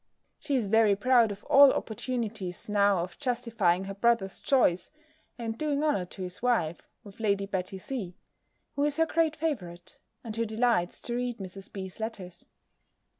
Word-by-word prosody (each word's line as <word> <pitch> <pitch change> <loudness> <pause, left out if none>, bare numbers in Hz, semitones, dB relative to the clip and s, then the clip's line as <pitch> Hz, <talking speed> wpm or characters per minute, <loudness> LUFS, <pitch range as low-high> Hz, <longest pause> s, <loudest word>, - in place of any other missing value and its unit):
She 285 - -1
is 245 -5 +1
very 215 0 +4
proud 235 +1 +4
of 200 0 -8
all 280 0 +7
opportunities 220 -5 -4
now 200 -3 +3
of 175 - -9
justifying 230 -9 0
her 195 +1 -5
brother's 200 -2 +1
choice, 240 -10 +2 0.5
and 225 -2 -4
doing 295 +2 -1
honour 290 -12 +1
to 185 +2 -8
his 180 0 -7
wife, 220 -10 +1 0.2
with 200 0 -14
Lady 200 -2 +1
Betty 190 -1 -3
C., 190 -4 -5 0.6
who 285 - 0
is 295 0 0
her 325 - +4
great 325 -1 +1
favourite, 200 - -4 0.2
and 220 -2 -6
who 230 - 0
delights 220 -5 +1
to 240 - -4
read 245 -1 -2
Mrs. 195 -1 -9
B.'s 190 -1 -7
letters. 190 -6 -7
220 Hz, 165 wpm, -28 LUFS, 190-245 Hz, 0.6 s, all